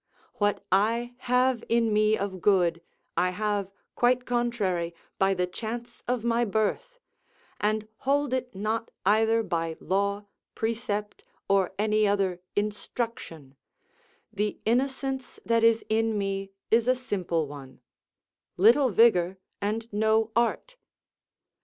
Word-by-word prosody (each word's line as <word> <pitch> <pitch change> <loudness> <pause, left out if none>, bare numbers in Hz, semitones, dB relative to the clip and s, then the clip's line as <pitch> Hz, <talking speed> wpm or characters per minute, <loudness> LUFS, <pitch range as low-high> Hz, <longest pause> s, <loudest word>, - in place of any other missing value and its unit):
What 205 -1 0
I 230 +5 +2
have 250 -1 +2
in 230 -2 +2
me 215 +1 +3
of 190 -2 -4
good, 175 -4 +3 0.3
I 180 - +2
have, 205 0 -1 0.2
quite 250 +1 +2
contrary, 205 -9 -1 0.2
by 195 0 +3
the 180 0 +1
chance 235 +5 -6
of 245 -2 -1
my 235 0 +2
birth; 225 - -1 0.6
and 215 +1 0
hold 280 0 0
it 250 -3 -2
not 220 +3 -2 0.2
either 225 +3 +3
by 165 -4 -2
law, 200 +2 -1 0.3
precept, 220 -2 -3 0.2
or 195 -2 +2
any 215 0 +2
other 195 -3 +1 0.2
instruction; 205 - -4 0.8
the 210 +1 -2
innocence 265 +2 -1
that 230 -1 +2
is 230 0 +4
in 220 0 +1
me 195 -1 -2 0.2
is 230 +1 +4
a 255 - +4
simple 185 -10 -2
one; 140 -2 -11 0.8
little 240 +8 +5
vigour 190 -5 +4 0.2
and 220 +3 -2
no 220 +1 +2
art. 240 - 0
215 Hz, 120 wpm, -27 LUFS, 195-235 Hz, 0.8 s, little